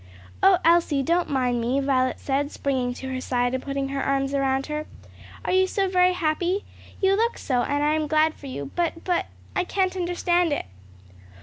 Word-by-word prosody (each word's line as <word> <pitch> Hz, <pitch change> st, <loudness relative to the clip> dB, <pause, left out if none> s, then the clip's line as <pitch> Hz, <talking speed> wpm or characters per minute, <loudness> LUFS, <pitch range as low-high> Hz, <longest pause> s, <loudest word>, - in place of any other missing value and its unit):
"O 385 Hz, -1 st, +6 dB
Elsie, 330 Hz, -4 st, +4 dB
don't 340 Hz, +4 st, +1 dB
mind 250 Hz, -3 st, 0 dB
me!" 250 Hz, +4 st, +1 dB
Violet 260 Hz, -2 st, +1 dB
said, 285 Hz, +1 st, -1 dB
springing 260 Hz, -3 st, -1 dB
to 265 Hz, -, -6 dB
her 255 Hz, -, -3 dB
side 245 Hz, -1 st, 0 dB
and 260 Hz, -, -1 dB
putting 275 Hz, 0 st, -3 dB
her 275 Hz, 0 st, -2 dB
arms 275 Hz, 0 st, 0 dB
around 270 Hz, -1 st, +1 dB
her. 300 Hz, 0 st, -4 dB, 0.6 s
"Are -, -, 0 dB
you 375 Hz, 0 st, +4 dB
so 390 Hz, +1 st, 0 dB
very 365 Hz, -1 st, +3 dB
happy? 355 Hz, +3 st, 0 dB, 0.3 s
You 385 Hz, 0 st, +3 dB
look 460 Hz, +3 st, 0 dB
so, 250 Hz, -3 st, 0 dB
and 285 Hz, +4 st, 0 dB
I 300 Hz, +1 st, +3 dB
am 310 Hz, -1 st, 0 dB
glad 310 Hz, +1 st, +3 dB
for 285 Hz, -, -11 dB
you; 140 Hz, -, -6 dB
but 335 Hz, -1 st, -1 dB
but 355 Hz, -2 st, 0 dB, 0.3 s
I 365 Hz, -, +2 dB
can't 375 Hz, 0 st, 0 dB
understand 350 Hz, -2 st, +1 dB
it." -, -, -2 dB
295 Hz, 195 wpm, -24 LUFS, 270-355 Hz, 0.6 s, O